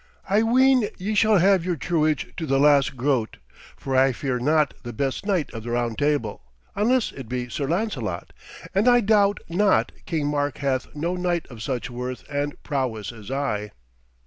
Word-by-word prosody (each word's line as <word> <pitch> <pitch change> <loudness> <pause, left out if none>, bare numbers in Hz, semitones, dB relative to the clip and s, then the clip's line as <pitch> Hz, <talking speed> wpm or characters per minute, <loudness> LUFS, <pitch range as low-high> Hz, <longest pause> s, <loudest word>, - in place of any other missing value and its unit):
I 205 +3 +3
ween 250 0 +4
ye 200 +3 -3
shall 215 0 +4
have 190 0 +4
your 180 0 -1
truage 155 -1 0
to 160 -3 -3
the 135 0 +2
last 140 -2 +4
groat, 125 -3 0 0.4
for 135 -1 -3
I 130 0 +4
fear 125 0 -2
not 150 +3 +2
the 120 -1 -7
best 135 - -2
knight 185 -7 0
of 115 - -6
the 120 - -7
Round 120 -1 -1
Table, 145 - -1 0.3
unless 235 +4 +2
it 130 -5 -9
be 125 -1 -3
Sir 140 +3 -3
Lancelot, 205 +8 -2 0.4
and 200 +5 +2
I 245 -1 +6
doubt 205 -1 +3
not 195 +5 +2 0.2
King 155 -4 -1
Mark 145 -4 -1
hath 135 -2 -1
no 170 +4 -2
knight 175 -2 -1
of 115 -3 -10
such 125 -1 -3
worth 125 +1 -5
and 145 0 -2
prowess 125 -7 -2
as 110 -2 -11
I.' 130 -7 -2
145 Hz, 180 wpm, -24 LUFS, 125-190 Hz, 0.4 s, I